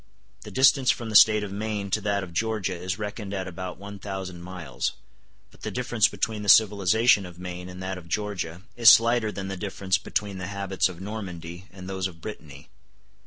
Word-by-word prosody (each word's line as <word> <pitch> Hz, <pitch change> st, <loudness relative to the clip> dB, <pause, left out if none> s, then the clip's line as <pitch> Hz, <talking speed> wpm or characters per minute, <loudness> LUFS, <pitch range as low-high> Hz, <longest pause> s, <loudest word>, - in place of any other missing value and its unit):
The -, -, -9 dB
distance 130 Hz, 0 st, +4 dB
from 115 Hz, -1 st, 0 dB
the -, -, -4 dB
State 105 Hz, 0 st, +7 dB
of 100 Hz, -, -5 dB
Maine 105 Hz, -1 st, -3 dB
to 110 Hz, -, +1 dB
that 100 Hz, -1 st, 0 dB
of 90 Hz, -2 st, -9 dB
Georgia 105 Hz, -1 st, -1 dB
is 90 Hz, +2 st, -4 dB
reckoned 105 Hz, -1 st, -5 dB
at 95 Hz, -1 st, -3 dB
about 90 Hz, 0 st, -6 dB
one 100 Hz, +1 st, -9 dB
thousand 95 Hz, -3 st, -6 dB
miles; 85 Hz, -8 st, -4 dB, 0.6 s
but -, -, -21 dB
the -, -, -4 dB
difference 120 Hz, -3 st, +2 dB
between 110 Hz, -2 st, -2 dB
the 105 Hz, -, -2 dB
civilization 105 Hz, +1 st, +5 dB
of 90 Hz, -2 st, -10 dB
Maine 90 Hz, 0 st, -7 dB
and 90 Hz, 0 st, -8 dB
that 95 Hz, 0 st, -4 dB
of 85 Hz, -, -15 dB
Georgia 90 Hz, -2 st, -3 dB
is 120 Hz, -2 st, +8 dB
slighter 115 Hz, -1 st, +5 dB
than 95 Hz, -1 st, -5 dB
the 95 Hz, -, -4 dB
difference 95 Hz, -1 st, -1 dB
between 100 Hz, -2 st, -3 dB
the 90 Hz, -, -4 dB
habits 100 Hz, -2 st, 0 dB
of 90 Hz, -1 st, -10 dB
Normandy 95 Hz, -4 st, -7 dB
and 95 Hz, -1 st, -10 dB
those 95 Hz, -1 st, -2 dB
of 85 Hz, -3 st, -13 dB
Brittany. 75 Hz, -9 st, -9 dB
95 Hz, 200 wpm, -26 LUFS, 90-105 Hz, 0.6 s, is